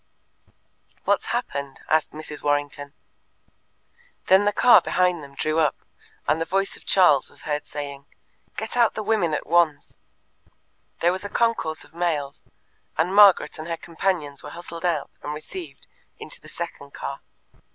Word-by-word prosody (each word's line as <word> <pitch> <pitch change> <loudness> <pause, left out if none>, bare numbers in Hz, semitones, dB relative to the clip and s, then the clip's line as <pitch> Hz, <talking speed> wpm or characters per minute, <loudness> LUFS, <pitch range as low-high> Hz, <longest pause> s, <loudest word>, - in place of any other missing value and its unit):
"What's - - +1
happened?" 140 -1 -3
asked 155 0 +2
Mrs. 155 -1 -7
Warrington. 145 -1 -1 1.3
Then 190 +2 +5
the 205 - +3
car 245 +4 +7
behind 180 -2 +1
them 140 -1 -12
drew 155 +3 0
up, 155 -2 +2 0.5
and 160 - +2
the - - 0
voice 195 +3 +1
of - - -15
Charles 175 -8 +5
was - - -12
heard 150 -1 -3
saying: 140 -1 -7 0.5
"Get 220 +2 -4
out 235 -2 +3
the 215 - -3
women 205 -7 +1
at - - -4
once." 160 -3 +1 1.0
There 175 - +4
was 185 +1 -2
a 205 - -5
concourse 230 -10 0
of - - -18
males, 160 -5 -2 0.5
and 175 +4 +1
Margaret 200 -7 +6
and 155 - -6
her 165 -1 -3
companions 165 -5 -2
were - - -9
hustled 170 0 -7
out 165 -4 -2
and 150 +1 -4
received 345 - -8 0.3
into - - -7
the - - -13
second - - -7
car. - - -5
165 Hz, 155 wpm, -24 LUFS, 150-190 Hz, 1.3 s, car